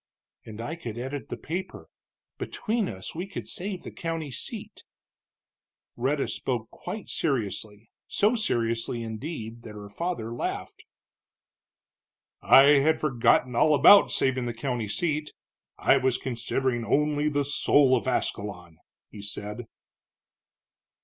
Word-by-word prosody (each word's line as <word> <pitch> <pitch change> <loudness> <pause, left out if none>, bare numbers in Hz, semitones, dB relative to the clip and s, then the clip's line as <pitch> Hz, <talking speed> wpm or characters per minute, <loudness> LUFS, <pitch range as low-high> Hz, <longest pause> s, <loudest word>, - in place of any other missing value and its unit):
"And 110 -1 -9
I 145 +8 -4
could 120 -8 -6
edit 130 0 -5
the - - -4
paper. 180 +5 -5 0.5
Between 220 -2 -2
us 95 -2 -7
we 175 +4 -4
could 195 - -7
save 185 -1 -5
the - - -7
county 165 -3 -4
seat." 120 - -5 1.1
Rhetta 135 +4 0
spoke 120 -4 -3
quite 210 -1 -7
seriously, 110 - -2 0.2
so 210 +3 +2
seriously, 115 - -1
indeed, 115 0 -6
that 110 -2 -10
her 105 -1 -9
father 115 - -3
laughed. 120 - -5 1.6
"I 135 - +8 0.2
had 155 +3 +3
forgotten 125 -3 +2
all 150 +5 +5
about 165 +8 +8
saving 130 -2 0
the 120 - -4
county 120 -2 -2
seat 150 - -1 0.4
I 140 - +4
was 130 -2 +1
considering 125 0 -1
only 150 +5 +1
the 145 -1 0
soul 140 -1 +4
of 125 - -2
Ascalon," 95 -9 -2 0.3
he 105 - -9
said. 105 +3 -5
130 Hz, 125 wpm, -27 LUFS, 115-150 Hz, 1.6 s, I